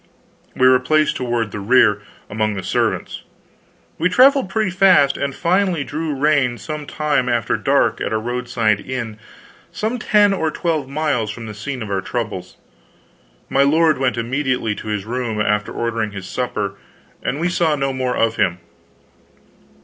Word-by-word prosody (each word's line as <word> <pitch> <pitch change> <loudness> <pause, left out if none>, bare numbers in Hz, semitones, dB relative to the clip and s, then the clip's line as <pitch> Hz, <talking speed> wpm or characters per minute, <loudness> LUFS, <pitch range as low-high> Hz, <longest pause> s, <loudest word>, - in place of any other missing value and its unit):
We 130 - +4
were 130 0 +6
placed 155 +4 +2
toward 120 -4 -2
the 105 - -5
rear, 105 -1 +4 0.3
among 110 0 -1
the 95 - -5
servants. - - -1 0.8
We 165 - +2
traveled 265 +1 +5
pretty 215 -3 0
fast, 185 -7 +4
and 140 -1 -3
finally 180 -2 +1
drew 150 +1 -3
rein 135 -4 +2
some 150 0 -6
time 150 -5 0
after 120 -3 0
dark - - +1
at - - -2
a 110 - +1
roadside 120 -2 0
inn 115 -3 -5 0.5
some 225 +4 -2
ten 205 -2 +4
or 160 -5 0
twelve 155 -4 -2
miles 140 -7 -1
from 115 +2 -7
the 110 - -7
scene 120 +4 -5
of 105 - -7
our 95 -1 0
troubles. 105 -6 -5 0.9
My 135 - +2
lord 155 +1 +3
went 130 -2 0
immediately 125 -1 -1
to 105 - -9
his 105 -2 -3
room, 120 -2 -3
after 105 0 0
ordering 115 -3 -2
his 100 -2 -7
supper, 105 -6 -3 0.4
and 140 - -2
we 170 - +1
saw 170 -3 +1
no 135 -1 -1
more 130 -1 -2
of 115 0 +1
him. 85 0 +1
130 Hz, 165 wpm, -19 LUFS, 110-155 Hz, 0.9 s, were